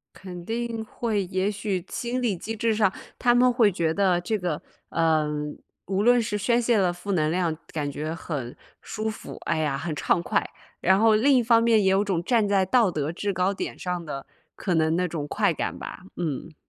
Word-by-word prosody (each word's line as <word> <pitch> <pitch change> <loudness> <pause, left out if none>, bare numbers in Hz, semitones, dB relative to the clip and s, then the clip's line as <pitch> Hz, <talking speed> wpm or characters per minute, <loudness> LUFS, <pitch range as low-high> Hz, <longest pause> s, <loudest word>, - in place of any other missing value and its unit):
肯 180 -2 -9
定 230 0 -3
会， 215 -2 -1
也 190 +2 0
许 200 -4 -3
心 245 +1 -2
理 225 -5 +1
机 225 +6 -5
制 225 +1 +1
上， 210 -3 +3 0.3
他 240 -1 +4
们 250 +1 +5
会 235 -4 +4
觉 165 -2 0
得 185 -2 +2
这 215 +4 -1
个， 175 -5 -2 0.3
嗯， 150 -2 0 0.3
无 195 0 0
论 245 +3 +5
是 210 -1 -2
宣 235 +4 +2
泄 235 -1 +2
了 185 -3 +3
负 175 +3 -5
能 155 -5 +2
量， 170 -1 0 0.2
感 145 -2 -2
觉 155 +3 -4
很 140 -8 -5 0.3
舒 220 0 -3
服， 215 - -8
哎 - - 0
呀， 150 -3 0
很 155 +2 -3
畅 170 - +1
快。 - - +1 0.4
然 190 +1 +4
后 220 -1 +5
另 270 +6 +4
一 245 - +3
方 230 0 +5
面 230 -2 +4
也 190 - +4
有 195 +1 +3
种 185 -5 -1
站 225 +1 +2
在 195 -2 +3
道 230 +1 +4
德 155 -3 -2
制 200 +4 -2
高 185 +2 +1
点 - - -5
上 180 -1 -3
的 135 -2 -6 0.3
可 185 - -2
能 160 0 +2
那 180 +1 +1
种 155 -4 -4
快 - - +1
感 - - -3
吧， - - -7 0.2
嗯。 160 -1 -4
190 Hz, 225 characters per minute, -25 LUFS, 165-220 Hz, 0.4 s, 们